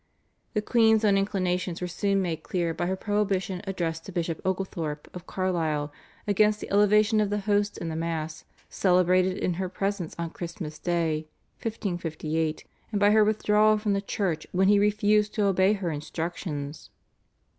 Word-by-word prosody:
The 210 Hz, -, +1 dB
queen's 220 Hz, -1 st, +4 dB
own 200 Hz, -2 st, +4 dB
inclinations 185 Hz, -3 st, 0 dB
were 180 Hz, -, -3 dB
soon 195 Hz, +2 st, 0 dB
made 165 Hz, -3 st, -3 dB
clear 170 Hz, -3 st, -1 dB
by 175 Hz, +1 st, -2 dB
her 190 Hz, -, 0 dB
prohibition 195 Hz, -2 st, -1 dB
addressed 165 Hz, -4 st, -2 dB
to -, -, -6 dB
Bishop 170 Hz, -3 st, -2 dB
Oglethorp 170 Hz, -5 st, -3 dB
of 180 Hz, 0 st, -9 dB
Carlisle 160 Hz, -6 st, -1 dB, 0.3 s
against 210 Hz, +1 st, +3 dB
the -, -, -8 dB
elevation 210 Hz, +2 st, +4 dB
of 210 Hz, -, +1 dB
the 205 Hz, 0 st, -1 dB
Host 205 Hz, 0 st, +1 dB
in 165 Hz, -, -4 dB
the 160 Hz, -, -4 dB
Mass 160 Hz, -1 st, -3 dB, 0.2 s
celebrated 185 Hz, 0 st, +3 dB
in 180 Hz, -, 0 dB
her 185 Hz, -, -2 dB
presence 195 Hz, -2 st, -3 dB
on 170 Hz, -1 st, -3 dB
Christmas 170 Hz, -3 st, -6 dB
Day 165 Hz, -3 st, -1 dB, 0.3 s
(1558), 165 Hz, -7 st, -2 dB, 0.2 s
and 210 Hz, -, -1 dB
by 205 Hz, 0 st, +5 dB
her 215 Hz, 0 st, +6 dB
withdrawal 215 Hz, 0 st, +3 dB
from 210 Hz, -1 st, 0 dB
the 200 Hz, -, 0 dB
church 185 Hz, -6 st, -2 dB
when 190 Hz, +1 st, +3 dB
he 205 Hz, 0 st, +5 dB
refused 210 Hz, 0 st, +2 dB
to 210 Hz, -3 st, +2 dB
obey 190 Hz, +1 st, +4 dB
her 190 Hz, -5 st, -2 dB
instructions. 155 Hz, -1 st, -5 dB
185 Hz, 165 wpm, -27 LUFS, 165-205 Hz, 0.3 s, her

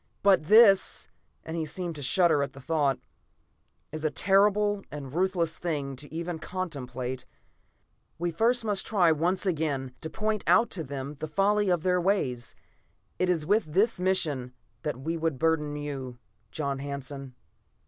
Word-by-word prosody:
"But 195 Hz, -6 st, +4 dB
this," 205 Hz, 0 st, +5 dB, 0.3 s
and 160 Hz, -, -6 dB
he 165 Hz, -, -1 dB
seemed 170 Hz, +3 st, -3 dB
to 145 Hz, -, -7 dB
shudder 160 Hz, +3 st, +4 dB
at 140 Hz, -1 st, -3 dB
the 135 Hz, -, -11 dB
thought, 140 Hz, -2 st, +1 dB, 0.9 s
"is 155 Hz, 0 st, -6 dB
a 155 Hz, -, +2 dB
terrible 205 Hz, +3 st, +3 dB
and 145 Hz, -1 st, -7 dB
a -, -, -8 dB
ruthless 170 Hz, +1 st, 0 dB
thing 145 Hz, -5 st, -3 dB
to 145 Hz, +2 st, -11 dB
even 165 Hz, +1 st, -4 dB
contemplate. 130 Hz, -8 st, -5 dB, 0.9 s
We 175 Hz, +1 st, -1 dB
must 230 Hz, +8 st, +2 dB
first 205 Hz, -3 st, -1 dB
try 180 Hz, -6 st, +4 dB
once 175 Hz, +5 st, 0 dB
again 145 Hz, -7 st, -1 dB
to 160 Hz, -, -5 dB
point 215 Hz, +2 st, -2 dB
out 235 Hz, -, +4 dB
to 170 Hz, -, -3 dB
them 140 Hz, 0 st, -5 dB
the 155 Hz, -, -4 dB
folly 200 Hz, +5 st, +2 dB
of 175 Hz, -3 st, +1 dB
their 180 Hz, -1 st, +2 dB
ways. 135 Hz, -, -1 dB, 0.6 s
It 185 Hz, -, +1 dB
is 165 Hz, -4 st, +1 dB
with 200 Hz, -4 st, +1 dB
this 210 Hz, +2 st, +3 dB
mission 155 Hz, -9 st, 0 dB, 0.3 s
that 145 Hz, -4 st, -3 dB
we 165 Hz, +5 st, -3 dB
would 160 Hz, -4 st, -1 dB
burden 150 Hz, -1 st, +1 dB
you, 135 Hz, -4 st, -5 dB, 0.3 s
John 140 Hz, -3 st, -3 dB
Hanson." 140 Hz, -1 st, -6 dB
160 Hz, 160 wpm, -28 LUFS, 140-190 Hz, 0.9 s, this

